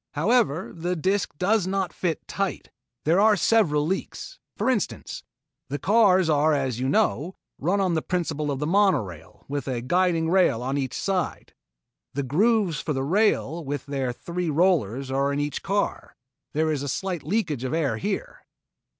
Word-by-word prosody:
However, 190 Hz, -, +1 dB
the 175 Hz, +2 st, -2 dB
disc 190 Hz, 0 st, -1 dB
does 195 Hz, +2 st, +2 dB
not 190 Hz, -2 st, -1 dB
fit 170 Hz, -3 st, -3 dB
tight. 195 Hz, -1 st, -3 dB, 0.3 s
There 165 Hz, +5 st, +4 dB
are 215 Hz, +1 st, +5 dB
several 170 Hz, -8 st, +3 dB
leaks. 190 Hz, -, -4 dB, 0.2 s
For -, -, -1 dB
instance, 250 Hz, -7 st, -1 dB, 0.5 s
the 145 Hz, -, -2 dB
cars 190 Hz, -, +4 dB
are 155 Hz, 0 st, +3 dB
as 130 Hz, -4 st, -1 dB
you 130 Hz, +1 st, 0 dB
know, 160 Hz, +5 st, +1 dB, 0.2 s
run 180 Hz, +8 st, +1 dB
on 185 Hz, -3 st, +1 dB
the 160 Hz, -, +1 dB
principle 155 Hz, -4 st, -2 dB
of 140 Hz, -, -1 dB
the 150 Hz, -, -2 dB
monorail 110 Hz, -, 0 dB
with 140 Hz, -2 st, -4 dB
a 130 Hz, -3 st, -1 dB
guiding 170 Hz, +5 st, +1 dB
rail 170 Hz, -10 st, +3 dB
on 135 Hz, +2 st, -2 dB
each 135 Hz, -2 st, -2 dB
side. 190 Hz, -3 st, -2 dB, 0.6 s
The 140 Hz, -, -1 dB
grooves 185 Hz, -, +2 dB
for 150 Hz, -, -2 dB
the 135 Hz, -1 st, -1 dB
rails 170 Hz, -1 st, +1 dB
with 145 Hz, 0 st, -4 dB
their 135 Hz, -3 st, -2 dB
three 170 Hz, +7 st, -4 dB
rollers 140 Hz, -, +1 dB
are 140 Hz, +1 st, +1 dB
in 140 Hz, -, -1 dB
each 145 Hz, 0 st, -2 dB
car. 200 Hz, +1 st, -2 dB, 0.4 s
There 155 Hz, +1 st, +1 dB
is 145 Hz, -3 st, -1 dB
a 140 Hz, -, -3 dB
slight 180 Hz, +3 st, -2 dB
leakage 155 Hz, -, -1 dB
of 130 Hz, -, -2 dB
air 160 Hz, -4 st, 0 dB
here." -, -, -4 dB
160 Hz, 170 wpm, -25 LUFS, 140-190 Hz, 0.6 s, are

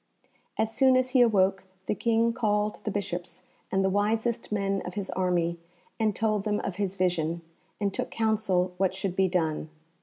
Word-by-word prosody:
As 220 Hz, 0 st, 0 dB
soon 260 Hz, -1 st, +5 dB
as 255 Hz, 0 st, +1 dB
he 255 Hz, -2 st, +5 dB
awoke 195 Hz, -4 st, +3 dB, 0.2 s
the -, -, 0 dB
King 230 Hz, +1 st, +2 dB
called 210 Hz, -3 st, 0 dB
the -, -, 0 dB
Bishops 195 Hz, -3 st, -4 dB, 0.3 s
and 190 Hz, 0 st, +2 dB
the -, -, +3 dB
wisest 220 Hz, +4 st, 0 dB
men 195 Hz, -1 st, 0 dB
of 180 Hz, -, -7 dB
his 200 Hz, -2 st, -3 dB
army, 175 Hz, -2 st, 0 dB, 0.4 s
and 215 Hz, -3 st, +1 dB
told 215 Hz, -2 st, 0 dB
them 210 Hz, -1 st, 0 dB
of 195 Hz, -, -4 dB
his 195 Hz, -2 st, -1 dB
vision, 170 Hz, -3 st, 0 dB, 0.4 s
and 200 Hz, -2 st, 0 dB
took -, -, -3 dB
counsel 210 Hz, -5 st, +1 dB
what 190 Hz, 0 st, +1 dB
should 190 Hz, -1 st, -3 dB
be 190 Hz, 0 st, +3 dB
done. 160 Hz, -4 st, -1 dB
200 Hz, 180 wpm, -28 LUFS, 185-220 Hz, 0.4 s, soon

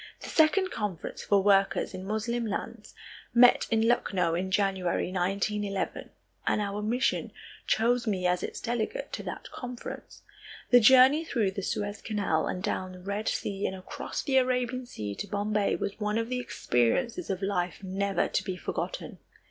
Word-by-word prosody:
The -, -, -7 dB
second 355 Hz, +4 st, +3 dB
Conference 205 Hz, -6 st, -4 dB
for 200 Hz, -2 st, +3 dB
Workers 195 Hz, -1 st, +3 dB
in 185 Hz, -, -6 dB
Moslem 225 Hz, +2 st, -1 dB
Lands 215 Hz, +1 st, -5 dB, 0.4 s
met 245 Hz, +1 st, +6 dB
in 225 Hz, 0 st, +2 dB
Lucknow 185 Hz, -8 st, +1 dB
in 180 Hz, +3 st, -1 dB
January 190 Hz, -3 st, 0 dB
1911 195 Hz, +2 st, -1 dB, 0.4 s
and -, -, +2 dB
our 205 Hz, 0 st, -2 dB
mission 235 Hz, +5 st, 0 dB, 0.4 s
chose 240 Hz, +2 st, +2 dB
me 190 Hz, -4 st, 0 dB
as 180 Hz, 0 st, +2 dB
its -, -, -5 dB
delegate 240 Hz, -, -3 dB
to -, -, -3 dB
that -, -, -7 dB
conference. 250 Hz, -1 st, -8 dB, 0.5 s
The 245 Hz, -, +9 dB
journey 260 Hz, +6 st, +7 dB
through 230 Hz, -11 st, 0 dB
the 195 Hz, -, -4 dB
Suez 205 Hz, +2 st, -3 dB
Canal 200 Hz, -8 st, 0 dB
and 180 Hz, -, -3 dB
down 185 Hz, -1 st, -2 dB
the 185 Hz, -, -11 dB
Red 200 Hz, +3 st, -4 dB
Sea 200 Hz, 0 st, -2 dB
and 190 Hz, -, -4 dB
across 185 Hz, 0 st, -5 dB
the 270 Hz, -2 st, +2 dB
Arabian 250 Hz, -1 st, +1 dB
Sea 105 Hz, -, -5 dB
to 205 Hz, -, -5 dB
Bombay 205 Hz, +1 st, 0 dB
was 200 Hz, -, -4 dB
one 210 Hz, 0 st, 0 dB
of 230 Hz, 0 st, -1 dB
the 255 Hz, 0 st, -1 dB
experiences 235 Hz, -, 0 dB
of 195 Hz, 0 st, -2 dB
life 180 Hz, -1 st, -1 dB
never 195 Hz, +1 st, 0 dB
to -, -, -1 dB
be 190 Hz, -3 st, -3 dB
forgotten. -, -, -4 dB
205 Hz, 165 wpm, -28 LUFS, 190-240 Hz, 0.5 s, The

